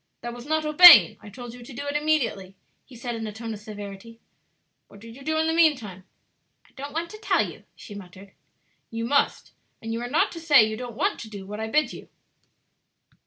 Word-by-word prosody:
"That 240 0 -6
was 240 +2 -11
not 315 0 -1
obeying; 305 - +8
I 210 - -12
told 240 +3 -10
you 245 - -12
to 240 +3 -12
do 285 +4 -7
it 285 0 -4
immediately," 250 -11 -1 0.3
he 260 - -16
said 240 +1 -6
in 225 -1 -5
a - - -6
tone 225 +1 -7
of 210 - -9
severity, 210 +1 -10 0.7
"What 200 - -17
did 225 +2 -13
you 275 - -14
do 315 +2 -1
in 315 - +1
the 320 - 0
mean 320 -3 +4
time?" 190 -6 -11 0.6
"I - - -26
don't 280 +2 -8
want 335 +2 -4
to 430 - -11
tell 435 - +1
you," - - -13
she 205 - -12
muttered. 195 0 -12 0.6
"You 230 0 -5
must; 280 +4 0 0.3
and 225 0 -6
you 230 - -4
are 245 - -5
not 355 +9 +1
to 335 - -8
say 295 -7 +5
you 220 - -4
don't 245 0 -8
want - - -1
to 220 - -9
do 200 -3 -9
what 210 +2 -8
I 220 - -3
bid 300 +7 0
you. - - -12
235 Hz, 230 wpm, -24 LUFS, 215-295 Hz, 0.7 s, obeying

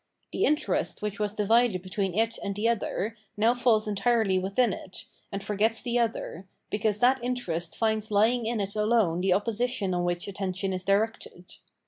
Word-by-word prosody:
The - - +1
interest 300 -7 0
which 210 +1 -3
was 210 0 -1
divided 215 -2 +2
between 190 -1 -2
it 225 +1 +1
and 200 - -3
the 210 +3 0
other, 225 -1 -1 0.2
now 225 +3 +4
falls 240 -3 +2
entirely 205 -1 +2
within 200 +4 +1
it, 185 - -7 0.3
and 200 -1 -4
forgets 215 +2 0
the 240 0 0
other, 220 -5 -2 0.2
because 210 0 +1
that 250 +2 +3
interest 180 -10 -2
finds 220 -1 0
lying 220 +3 +2
in 230 -1 -1
it 200 0 -3
alone 210 -5 +2
the 185 0 +3
opposition 215 -1 0
on 175 0 0
which 175 +1 -2
attention 190 -1 -2
is 185 0 -4
directed. 200 -3 -1
210 Hz, 170 wpm, -27 LUFS, 195-230 Hz, 0.3 s, now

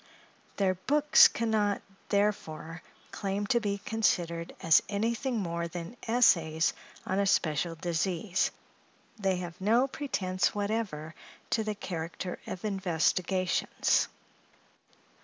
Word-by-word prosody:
Their 195 -2 +2
books 290 +11 +6
can 230 -1 -2
not, 205 -2 +1 0.3
therefore, 170 -6 -1 0.3
claim 200 +1 -2
to 235 +4 +2
be 205 -3 -1
considered 175 -6 -1
as 165 -2 +5
anything 230 +5 -1
more 170 -4 -2
than 170 +6 -7
essays 165 -9 +3 0.3
on 190 - 0
a 200 - +2
special 165 -2 +1
disease; 175 +3 0 0.7
they 195 -2 +1
have 175 -1 -6
no 230 +7 +3
pretence 195 -11 -1
whatever 200 -7 -2 0.4
to 225 - +2
the 215 -1 -3
character 180 -1 -5
of 185 - -6
investigations. 185 -1 +1
190 Hz, 110 wpm, -30 LUFS, 170-215 Hz, 0.7 s, books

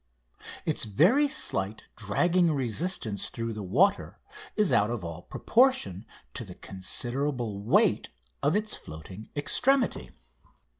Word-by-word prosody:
Its - - 0
very 180 - +4
slight 105 - -1
dragging 170 - +2
resistance 130 - -2
through 115 0 -4
the 105 - -6
water 180 - +1 0.4
is 210 -10 +2
out 105 -2 +4
of 115 -7 -4
all 85 0 -6
proportion 120 - +1 0.3
to - - -5
the - - -11
considerable 120 +3 -3
weight 105 - +2 0.3
of 145 +5 +2
its 215 +1 -1
floating 90 +7 -10
extremity. 260 - +2
120 Hz, 115 wpm, -28 LUFS, -, 0.4 s, very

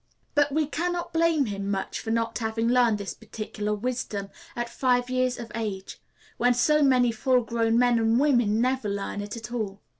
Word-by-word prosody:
But 290 -1 +3
we 310 +2 +1
can 335 +5 -2
not 345 -1 -5
blame 330 -3 +3
him 200 -2 -4
much 195 -1 -2
for 225 - -6
not 230 +1 -1
having 225 0 -1
learned 240 -3 +3
this 200 -1 -5
particular 210 -1 -4
wisdom 210 -3 -3 0.3
at 240 0 -2
five 245 0 0
years 255 0 +1
of 230 -2 -8
age, 205 -4 -5 0.4
when 245 0 +3
so 300 +5 +3
many 255 -4 +4
full 250 +2 +2
grown 230 0 +1
men 245 -1 +4
and 225 +1 +3
women 240 -7 +3
never 255 -3 0
learn 200 0 -3
it 205 +2 -6
at 225 0 -8
all. 205 -4 -3
235 Hz, 190 wpm, -26 LUFS, 215-255 Hz, 0.4 s, many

